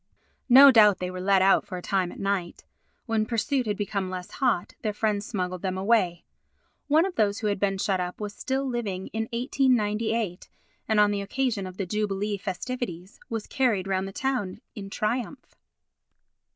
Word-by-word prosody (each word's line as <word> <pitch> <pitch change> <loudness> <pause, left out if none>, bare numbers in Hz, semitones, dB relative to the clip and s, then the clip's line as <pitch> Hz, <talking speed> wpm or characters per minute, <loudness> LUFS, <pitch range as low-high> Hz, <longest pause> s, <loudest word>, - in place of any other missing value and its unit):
No 270 +3 +10
doubt 210 -5 +6
they 180 0 -4
were 185 0 -6
let 190 0 +3
out 195 - +4
for 205 -3 -7
a - - -6
time 185 -3 0
at - - -11
night. 195 -3 -2 0.4
When 225 -2 +1
pursuit 245 +2 0
had 205 -1 -1
become 200 -2 -2
less 185 -1 -6
hot, 240 -10 0
their 215 -2 -1
friends 210 -1 -1
smuggled 185 -4 -3
them 185 -1 -2
away. 190 -4 +1 0.6
One 310 +4 +4
of 385 - -3
those 205 -2 +2
who 220 - -5
had 205 -2 0
been 195 -1 0
shut 190 -1 0
up 180 0 -4
was 210 -1 -5
still 270 +5 -2
living 210 -7 -3
in 220 0 -2
1898 230 - 0 0.4
and, 220 -1 +2
on 210 0 +5
the 200 -1 -1
occasion 225 -2 -1
of 185 0 -10
the 195 - -2
jubilee 205 +1 -2
festivities, 195 -1 -5
was 225 -2 -3
carried 240 -9 +1
round 190 0 -1
the - - -7
town 245 -5 -2
in 200 -4 -8
triumph. 240 +6 -3
205 Hz, 180 wpm, -26 LUFS, 190-235 Hz, 0.6 s, No